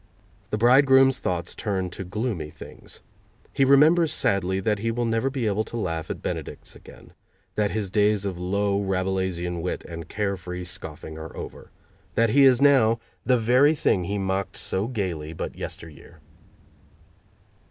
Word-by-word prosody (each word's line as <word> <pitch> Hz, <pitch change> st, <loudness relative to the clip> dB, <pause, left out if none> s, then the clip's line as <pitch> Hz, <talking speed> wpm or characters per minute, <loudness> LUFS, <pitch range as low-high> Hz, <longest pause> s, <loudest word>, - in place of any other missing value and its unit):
The 105 Hz, -, -1 dB
bridegroom's 135 Hz, +2 st, +5 dB
thoughts 90 Hz, -7 st, -3 dB
turn 95 Hz, -4 st, -2 dB
to 95 Hz, -, -6 dB
gloomy 95 Hz, -4 st, -3 dB
things. -, -, -12 dB, 0.5 s
He 135 Hz, -, +2 dB
remembers 150 Hz, +5 st, +5 dB
sadly 95 Hz, -1 st, +1 dB
that 105 Hz, +1 st, 0 dB
he 115 Hz, +2 st, -1 dB
will 120 Hz, +1 st, -1 dB
never 115 Hz, +3 st, 0 dB
be 130 Hz, -3 st, -3 dB
able 105 Hz, 0 st, +1 dB
to 120 Hz, -, -6 dB
laugh 85 Hz, -7 st, -3 dB
at -, -, -5 dB
benedicts -, -, -6 dB
again; -, -, -15 dB, 0.4 s
that 105 Hz, -1 st, +1 dB
his 105 Hz, -3 st, -3 dB
days 105 Hz, -1 st, +2 dB
of 95 Hz, -3 st, -4 dB
low, 100 Hz, +2 st, 0 dB
rabelaisian 95 Hz, -3 st, -2 dB
wit 90 Hz, -, -3 dB
and 85 Hz, -1 st, -8 dB
care 100 Hz, -2 st, -1 dB
free 90 Hz, 0 st, -6 dB
scoffing 80 Hz, -2 st, -7 dB
are 80 Hz, 0 st, -9 dB
over; -, -, -8 dB, 0.5 s
that 115 Hz, -1 st, +3 dB
he 140 Hz, +2 st, +6 dB
is 130 Hz, 0 st, +5 dB
now 125 Hz, -6 st, +5 dB, 0.3 s
the 125 Hz, -1 st, +4 dB
very 125 Hz, +7 st, +4 dB
thing 95 Hz, -, +1 dB
he 100 Hz, +3 st, -2 dB
mocked 95 Hz, 0 st, -2 dB
so 95 Hz, +3 st, -1 dB
gaily 90 Hz, -10 st, -3 dB
but -, -, -5 dB
yesteryear. 80 Hz, 0 st, -9 dB
100 Hz, 160 wpm, -25 LUFS, 90-120 Hz, 0.5 s, he